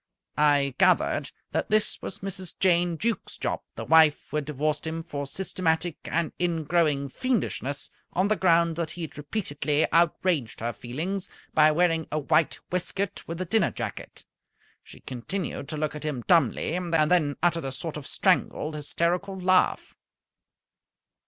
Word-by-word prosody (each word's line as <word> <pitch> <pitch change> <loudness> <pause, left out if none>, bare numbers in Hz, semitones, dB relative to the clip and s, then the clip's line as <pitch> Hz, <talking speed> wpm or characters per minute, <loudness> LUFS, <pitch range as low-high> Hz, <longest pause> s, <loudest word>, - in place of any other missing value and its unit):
I 145 -2 +4
gathered - - +3 0.2
that - - -1
this 215 0 +2
was - - -6
Mrs. 190 -2 -4
Jane 175 -2 +3
Jukes 230 +5 -2
Jopp, - - -2
the - - -5
wife 160 -2 +5
who 150 - -1
had 150 - -2
divorced 150 +2 -1
him 165 +1 -3
for 145 -4 -5
systematic 170 0 -1
and 165 -1 -1
ingrowing 160 -4 +1
fiendishness 145 - -2 0.2
on 185 +2 +2
the 215 - +2
ground 170 -3 +3
that 170 -2 -2
he 170 +2 -6
had 160 - -7
repeatedly 150 -2 0
outraged 165 -6 +1
her 120 +1 -2
feelings 165 - -4 0.2
by 155 0 +6
wearing 165 0 +2
a 155 - 0
white 155 +2 +2
waistcoat 185 +2 -2
with 165 +1 -5
a - - -1
dinner 190 +1 +2
jacket. - - -6 0.6
She - - -14
continued 140 +4 -4
to 155 - -4
look 155 0 -1
at 150 - -6
him 145 -6 -3
dumbly, 160 -4 +3
and 180 -1 -3 0.2
then 150 -6 +3
uttered 170 -3 +2
a 135 - -3
sort 150 +5 -5
of 150 -3 -7
strangled, 155 - +1
hysterical 175 +6 -1
laugh. 185 0 +2
165 Hz, 155 wpm, -26 LUFS, 150-180 Hz, 0.6 s, by